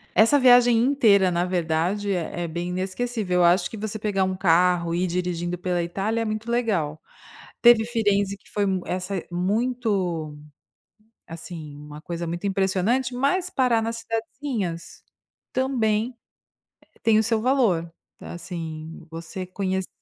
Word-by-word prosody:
Essa 230 +7 +6
viagem 245 -2 +6
inteira 225 -7 +4
na 175 0 0
verdade 180 +3 0
é 175 -1 -3
é 170 - -3
bem 170 +2 -4
inesquecível, 190 +1 -1
eu - - +5
acho 175 +3 +3
que - - -7
você 215 +1 -4
pegar 200 -2 0
1 185 0 -2
carro 175 -1 +3
e 175 +2 +1
ir - - +1
dirigindo 175 0 -2
pela 180 -1 -1
Itália 195 +6 -2
é - - 0
muito 215 +1 -4
legal. 190 -11 0 0.6
Teve 235 -2 +7
Firenzi 205 -4 0
que 200 - -24
foi 205 - 0 0.2
essa 185 0 -3
muito, 190 -5 -1 0.9
assim, 160 -2 -8
uma 150 +1 -10
coisa 170 0 -4
muito 175 +4 -4
impressionante. 200 +6 +1
Mas 315 +9 +1
parar 250 -6 +2
nas 230 +1 -3
cidadezinhas 225 - -4 0.5
também 245 -3 0 0.9
tem 225 -1 +4
o - - +2
seu 225 0 +1
valor, 220 -10 +2 0.3
assim 165 -2 -7
você 165 +3 -6
conhecer 190 0 -2
195 Hz, 140 wpm, -24 LUFS, 175-225 Hz, 0.9 s, Teve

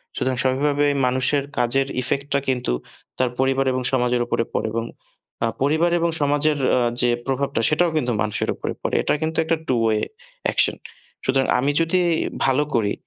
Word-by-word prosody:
সুতরাং 130 0 0
স্বাভাবিকভাবেই 145 +2 +2
মানুষের 130 +3 +1
কাজের 130 +3 +2
ইফেক্টটা 140 +2 -1
কিন্তু 125 - 0 0.5
তার 125 -1 +2
পরিবার 135 0 +2
এবং 130 - -1
সমাজের 125 -1 +1
উপরে 115 - 0
পড়ে - - 0
এবং 115 0 -1 0.6
আ - - +2
পরিবার 160 +5 +2
এবং 170 0 +1
সমাজের 145 +1 +2 0.2
আ - - +3 0.2
যে 120 - +3 0.2
প্রভাবটা, 135 -3 -1
সেটাও 165 +2 +2
কিন্তু 125 -4 0
মানুষের 105 -1 -1
উপরে - - -4
পড়ে। - - -2
এটা - - +1
কিন্তু 160 0 -2
একটা 160 0 0
2 125 -3 +2
ওয়ে 110 -1 +2 0.5
অ্যাকশন। - - +2 0.5
সুতরাং 135 0 +2
আমি 140 +3 +2
যদি 165 +3 +2 0.5
ভালো 135 +2 +3
করি, 105 -3 +1
135 Hz, 165 wpm, -22 LUFS, 125-145 Hz, 0.6 s, আ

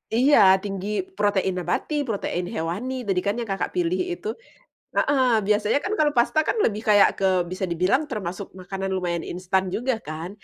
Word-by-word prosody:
Iya 265 +5 +5 0.3
tinggi 195 -1 -4 0.3
protein 195 -2 +1
nabati, 180 - -2
protein 195 -5 -2
hewani, 180 +11 -3
tadi 190 -2 +1
kan 200 +1 +1
yang 230 -3 -5
Kakak 195 - -2
pilih 360 +1 0
itu. 355 +4 -5 0.7
Heeh, 265 -3 +3 0.2
biasanya 210 +4 +2
kan 400 - -2
kalau 300 -1 +4
pasta 240 +6 +2
kan - - +1
lebih 215 0 0
kayak 205 -1 +7
ke 195 - +1 0.2
bisa 185 +2 -6
dibilang 185 - +2
termasuk 195 -4 -4
makanan 195 +1 -4
lumayan 175 -2 -2
instan 185 +1 0
juga 255 +3 0
kan, 155 +3 -5
200 Hz, 165 wpm, -24 LUFS, 185-245 Hz, 0.7 s, kayak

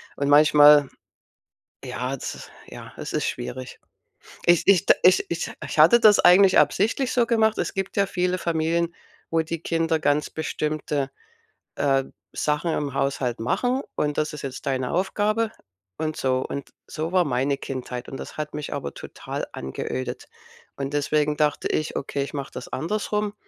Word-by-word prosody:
und 140 0 -1
manchmal 150 -1 +7 1.0
ja 130 +2 -4
z - - -7 0.2
ja, - - -11
es - - -6
ist - - -1
schwierig. 125 +1 -6 0.7
Ich 175 -1 +5
ich 195 -4 +5
d - - +7
ich 185 - +6
ich - - -3
ich - - -6
hatte 235 -1 +7
das 215 -3 +7
eigentlich 185 +2 +6
absichtlich 215 - +2
so 245 - +3
gemacht. 220 -2 +2
Es - - -1
gibt 195 0 -4
ja 200 -1 +3
viele 180 -1 0
Familien, 170 0 0 0.4
wo 165 0 +2
die 165 0 -5
Kinder 165 -1 0
ganz 150 0 +1
bestimmte, 150 -3 -2 0.7
äh, 135 -1 +2 0.3
Sachen 150 +3 -1
im 145 -2 -2
Haushalt 135 -3 -1
machen, 245 - 0
und 150 -1 -1
„Das 155 0 -1
ist 150 - -7
jetzt 135 -1 -6
deine 130 -2 -1
Aufgabe“ 210 +5 0 0.5
und 155 -1 -2
so. 130 -1 +1
Und 140 - -6 0.2
so 160 +2 -4
war 185 -1 +4
meine 135 +1 0
Kindheit, 125 -2 -6
und 135 - -7
das - - -9
hat 150 -1 -4
mich 150 -1 -5
aber - - -5
total - - -6
angeödet. 125 - -5 0.5
Und 140 0 -5
deswegen 150 +1 +1
dachte 150 -1 +1
ich, 155 - -2
okay, 140 0 -2
ich 140 - -8
mache 140 -2 -5
das 125 - -7
andersrum. 210 +3 -2
150 Hz, 165 wpm, -24 LUFS, 140-180 Hz, 1.0 s, manchmal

